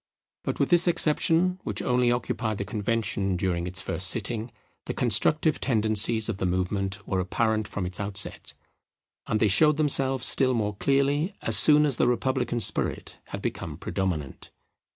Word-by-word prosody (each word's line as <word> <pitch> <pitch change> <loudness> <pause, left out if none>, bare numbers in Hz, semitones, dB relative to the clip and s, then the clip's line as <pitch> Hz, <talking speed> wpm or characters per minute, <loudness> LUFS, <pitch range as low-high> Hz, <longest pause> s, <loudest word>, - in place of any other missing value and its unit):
But - - -4
with - - 0
this 175 0 +5
exception, 170 +2 +2
which - - -4
only 125 -1 +1
occupied 115 -3 -3
the 100 - -4
Convention 105 -3 -2
during 85 -1 -2
its 90 +2 -4
first 95 - -1
sitting, 115 +3 -2 0.4
the - - -4
constructive 150 - +2
tendencies 110 -2 +2
of 115 -4 -3
the 95 - -1
movement 95 +2 -3
were 95 - -1
apparent 110 +3 -1
from 95 - -5
its 90 0 -5
outset; 100 -1 -1 0.7
and 110 - -1
they 110 - +3
showed 150 +9 +3
themselves 135 -4 +3
still 130 -2 +4
more 105 -2 -2
clearly 140 - 0
as - - +2
soon 150 0 +5
as 140 -5 0
the - - +2
republican 125 0 -1
spirit - - 0
had - - -8
become - - -5
predominant. 85 -8 -5
110 Hz, 160 wpm, -25 LUFS, 100-135 Hz, 0.7 s, this